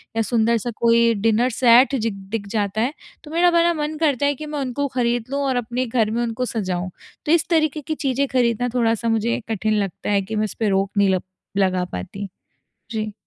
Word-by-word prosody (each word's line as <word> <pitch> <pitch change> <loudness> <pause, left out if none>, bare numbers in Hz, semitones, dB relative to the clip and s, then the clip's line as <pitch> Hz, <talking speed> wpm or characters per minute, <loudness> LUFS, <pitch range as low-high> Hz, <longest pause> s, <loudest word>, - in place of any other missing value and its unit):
या 225 - +2
सुंदर-सा 230 0 +1
कोई 235 0 +4
डिनर 225 +3 +2
सेट 250 +3 +5
जिग 230 -4 -1 0.2
दिख 215 -3 -3
जाता 205 0 -1
है। 255 +5 0 0.3
तो 300 - -11
मेरा 350 +2 +4
बड़ा 340 0 +3
मन 305 -1 -3
करता 285 -4 +2
है 285 0 +2
कि 305 - -7
मैं 300 -1 -4
उनको 275 +1 -2
ख़रीद 240 -2 +1
लूँ 280 - -1
और 265 -1 0
अपने 245 +1 -1
घर 225 -3 0
में 235 +2 -1
उनको 235 +2 -2
सजाऊँ। 185 -6 -3 0.4
तो 300 - +1
इस 335 -1 +3
तरीके 310 -3 +1
की 310 +2 -4
चीज़ें 275 -1 0
खऱीदना 245 -2 +1
थोड़ा-सा 230 -1 +1
मुझे 225 +1 +1
कठिन 215 0 0
लगता 195 -1 -3
है 200 -1 +3
कि 205 +3 -5
मैं 215 0 +1
इस 210 - -6
पे 220 -2 +1
रोक 195 0 +1
नहीं 200 -1 +4
लप 185 - -3 0.3
लगा 185 -2 +2
पाती। 195 - -6 0.6
जी। 215 -2 -3
235 Hz, 215 wpm, -22 LUFS, 215-270 Hz, 0.6 s, सेट